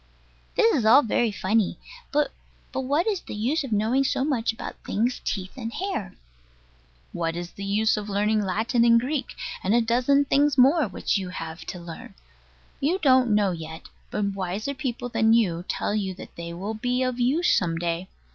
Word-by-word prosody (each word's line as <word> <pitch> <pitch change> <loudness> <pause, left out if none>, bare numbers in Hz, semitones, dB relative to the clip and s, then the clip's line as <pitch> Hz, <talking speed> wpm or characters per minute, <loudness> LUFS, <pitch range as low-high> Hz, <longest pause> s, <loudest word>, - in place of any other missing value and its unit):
This 455 0 +4
is 265 - +1
all 235 +7 +7
very 230 0 +1
funny: 205 +1 0 0.3
but 295 0 +1 0.4
what 280 +6 0
is 410 -5 0
the - - -8
use 260 +9 0
of 265 - -6
knowing 220 +6 +2
so 265 0 0
much 250 -7 +1
about 225 - -8
things' 240 +4 -1
teeth 190 -2 -3
and 230 -3 -5
hair? 235 - -4 1.0
What 165 -1 -2
is 175 0 -5
the 200 - -8
use 215 +3 +2
of 210 0 -5
learning 210 +2 +1
Latin 220 +5 +1
and 230 0 +6
Greek, 265 +2 -3 0.3
and 195 +4 +2
a - - +5
dozen 250 +5 +3
things 285 +1 +2
more 275 +2 +5
which 195 +1 -1
you 185 -2 -5
have 165 -2 -7
to - - -6
learn? 170 -1 -10 0.6
You 320 +7 +1
don't 260 - +4
know 205 -2 +3
yet: 160 -1 -8 0.2
but 210 - -2
wiser 195 +7 -3
people 250 -2 -4
than 225 -2 +3
you 180 -7 +2
tell - - -1
you 195 -3 -1
that - - -11
they 170 0 -6
will 190 +6 -4
be 250 +3 -1
of 255 -1 -2
use 280 +9 +3
some 165 -3 0
day. 170 +2 -2
225 Hz, 185 wpm, -25 LUFS, 190-260 Hz, 1.0 s, all